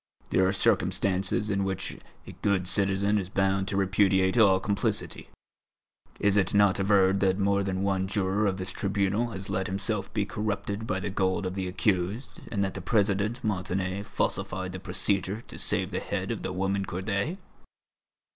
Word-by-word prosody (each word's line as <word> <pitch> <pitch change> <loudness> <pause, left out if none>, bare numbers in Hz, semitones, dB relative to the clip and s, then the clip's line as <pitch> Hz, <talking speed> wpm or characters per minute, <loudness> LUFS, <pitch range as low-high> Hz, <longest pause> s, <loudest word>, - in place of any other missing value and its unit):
There 95 - +4
are - - +2
circumstances 95 +1 +1
in 100 0 +1
which 95 0 -3 0.3
a - - -8
good 95 -3 +1
citizen 100 +2 +1
is 95 -2 -5
bound 95 0 +1
to 100 - -1
repudiate 95 0 +3
all 100 -5 +5
complicity. 100 +1 -1 0.9
Is 100 0 +3
it 95 0 +2
not 100 -1 +4
averred 95 -1 +4
that 95 -1 +2
more 100 0 +2
than 95 -1 -2
one 95 -1 0
juror 100 +1 +1
of 95 -1 0
this 95 -1 -4
tribunal 100 +4 0
has 95 -3 -6
let 95 0 -1
himself 100 0 -2
be 105 -2 0
corrupted 105 +1 -3
by 95 - -1
the 105 - -3
gold 95 0 0
of 90 - -2
the 95 -1 -3
accused, 95 +5 0 0.2
and 100 -3 0
that 95 - -2
the - - -6
President 105 +1 +1
Montané 95 -1 -1
falsified 95 -2 -2
the 95 - -6
procedure 95 +2 -1
to - - -10
save - - 0
the - - -1
head - - -3
of - - -3
the - - -3
woman 95 +2 0
Corday?" 100 - -2
95 Hz, 175 wpm, -28 LUFS, 95-100 Hz, 0.9 s, all